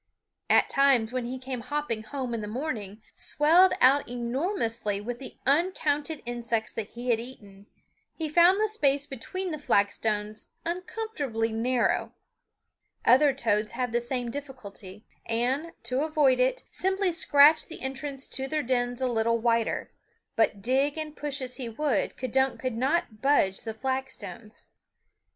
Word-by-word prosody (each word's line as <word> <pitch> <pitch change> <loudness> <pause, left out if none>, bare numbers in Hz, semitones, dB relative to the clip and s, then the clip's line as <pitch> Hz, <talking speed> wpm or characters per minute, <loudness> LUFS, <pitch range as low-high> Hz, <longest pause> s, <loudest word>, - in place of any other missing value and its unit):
At - - +5
times 260 -5 +3
when 255 -2 -2
he 255 +2 -4
came 255 -1 -5
hopping 290 -4 -2
home 255 +2 -5
in 230 - -2
the 210 - -5
morning, 220 -4 -5
swelled 340 +5 +4
out 275 +1 +5
enormously 240 - -2
with 240 +3 -5
the 265 - -9
uncounted 300 0 +1
insects 235 -2 -2
that 220 -2 -4
he 240 +2 -3
had 225 - +2
eaten, 205 -5 -11 0.5
he 320 - -3
found 345 +5 +5
the 435 - +3
space 285 -10 +2
between 355 +9 -5
the 305 - -4
flagstones 210 -2 0
uncomfortably 335 - -3
narrow. 240 +3 0 0.9
Other 275 +4 +6
toads 220 -5 0
have 250 0 -2
the 240 +1 +1
same 245 -1 -2
difficulty 220 -8 -9 0.2
and, 255 +8 0
to 250 +3 -1
avoid 295 -5 +3
it, 255 +1 +1
simply 380 0 +1
scratch 310 -1 +5
the 330 - -9
entrance 270 +1 -4
to 265 0 -3
their 305 +2 -1
dens 245 0 -1
a - - +2
little 230 -1 +1
wider; 230 0 0 0.4
but 215 -3 +1
dig 270 +5 +1
and 310 -1 -4
push 285 -2 -3
as 250 0 -4
he 250 -4 -4
would, 250 -1 -1
K'dunk 265 +1 0
could 255 -2 -2
not 265 -2 -1
budge 270 -9 +2
the 225 - -5
flagstones. 235 -5 -5
255 Hz, 150 wpm, -27 LUFS, 230-290 Hz, 0.9 s, Other